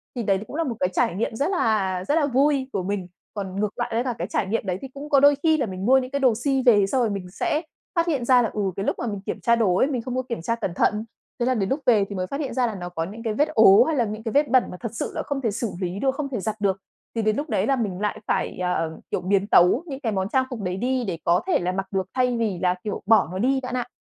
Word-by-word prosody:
Thì 240 - -2
đấy 195 -2 +2
cũng - - -8
là 330 - 0
một 255 -7 -3
cái 185 - +1
trải 175 - +1
nghiệm 220 +2 -2
rất 285 - 0
là 205 - +1
rất 295 - +2
là 320 -3 +3
vui 275 0 +2
của 195 - -1
mình. 195 -1 -3 0.3
Còn 195 -3 -5
ngược 210 0 +1 0.2
với 230 +2 0
cả 250 -2 -2
cái - - -3
trải 195 - -1
nghiệm 215 +2 -1
đấy, 185 -2 -1
thì 270 - -6
cũng 285 +2 -8
có 280 - +5
đôi 285 +1 +6
khi 315 -1 +4
là 275 - 0
mình 190 -2 -5
mua 260 +3 +6
những 255 -1 -2
cái 280 - -1
đồ 260 -4 +4
si 265 +3 0
về, 205 -5 +5
xong 255 +5 +1
rồi 235 - +2
mình 195 -3 -4
sẽ 300 +9 -1 0.3
phát 335 0 +2
hiện 280 -8 0
ra 250 0 +5
là, 230 - 0
ừ, 210 - -2
cái 195 - -3
lúc - - 0
mà 240 - -2
mình 205 -3 -4
kiểm - - -4
tra 235 - +4
đồ 210 -6 +2
ấy, 260 - +3
mình 260 -5 -2
không 250 +1 -5
có 255 - +1
kiểm 235 -8 -3
tra 230 +7 -1
cẩn 215 -6 -3
thận. 210 +3 +1 0.3
Thế 240 - +1
là 255 - +2
đến 200 -5 -1
lúc 275 - 0
về 220 -5 +4
thì 200 - -5
mới 185 -1 -2
phát 275 - -4
hiện 280 -4 -3
ra 255 -2 +1
là 220 - -4
nó 175 -2 -6
có 165 -2 -3
những 210 +7 -8
cái 225 -2 -1
vết 295 +7 +2
ố, 220 -7 +7
hay 320 +4 -1
là 245 -4 +2
những 215 +1 -6
cái 225 - -3
vết 290 +4 +3
bẩn 255 0 +5
mà 180 - -8
thật 230 -3 -5
sự 230 - -3
là - - -2
không 280 -1 -3
thể 230 -4 0
xử 220 0 -3
lý 180 +1 -3
được, 265 +2 +1
không 280 -1 -3
thể 250 -5 -3
giặt 215 +2 -2
được, 195 -2 +1 0.4
thì 225 - 0
đến 215 -1 +1
lúc 295 +2 -3
đấy - - 0
là 275 - +3
mình 205 -7 -2
lại 210 +1 -2
phải, - - -1
ờ, 180 -3 -1
kiểu, - - -1
biến 195 +2 +1
tấu 185 - +5
những 275 -5 -6
cái 235 -6 -2
món 190 -1 -1
trang 260 +2 +2
phục 245 -5 -6
đấy 180 -1 -3
đi 255 +4 0
để 175 -3 -2
có 170 - +3
thể 375 - +3
là 180 0 -1
mặc 195 +1 -3
được 190 -2 -1
thay 250 -2 +1
vì 215 -6 -1
là, 180 -1 +2
kiểu, 210 - -4
bỏ 220 -3 +5
nó 185 - -4
đi 265 +5 +2
bạn 250 0 -4
ạ. 250 -1 -2
225 Hz, 325 wpm, -24 LUFS, 195-265 Hz, 0.4 s, ố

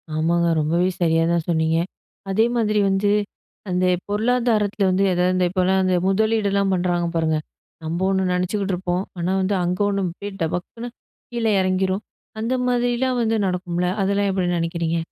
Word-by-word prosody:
ஆமாங்க. 170 +2 +1
ரொம்பவே 170 +4 +1
சரியா 165 -1 +3
தான் 170 -2 0
சொன்னீங்க. 160 0 +2 0.5
அதே 215 +4 +3
மாதிரி 215 -2 +1
வந்து 195 +1 +1 0.6
அந்த 185 0 +1 0.2
பொருளாதாரத்துல 215 -2 +1
வந்து 185 +1 +2
எதாவது 180 +1 +2
இந்த 185 - +2
இப்போலாம் 190 +1 +2
அந்த 185 -1 +2
முதலீடுலாம் 200 -1 +1
பண்ணுறாங்க 175 -1 0
பாருங்க. 160 -1 +1 0.5
நம்ப 165 +2 -3
ஒண்ணு 190 0 +1
நினைச்சுக்கிட்டுருப்போம். 180 -1 -1 0.2
ஆனா, 175 +2 -1
வந்து 195 +2 0
அங்க 180 +1 -1
ஒண்ணு 200 -1 -1
அப்படியே 185 +4 -6
டபக்குனு, 180 +9 -3 0.4
கீழ 235 -1 -3 0.2
இறங்கிரும். 185 +1 0 0.4
அந்த 230 +3 -1
மாதிரிலாம் 245 +1 +1
வந்து 225 -1 +1
நடக்கும்ல, 180 -1 -1
அதெல்லாம் 200 +1 +1
எப்படி 185 -2 0
நினைக்கிறீங்க? 170 0 -1
185 Hz, 145 wpm, -22 LUFS, 175-205 Hz, 0.6 s, சரியா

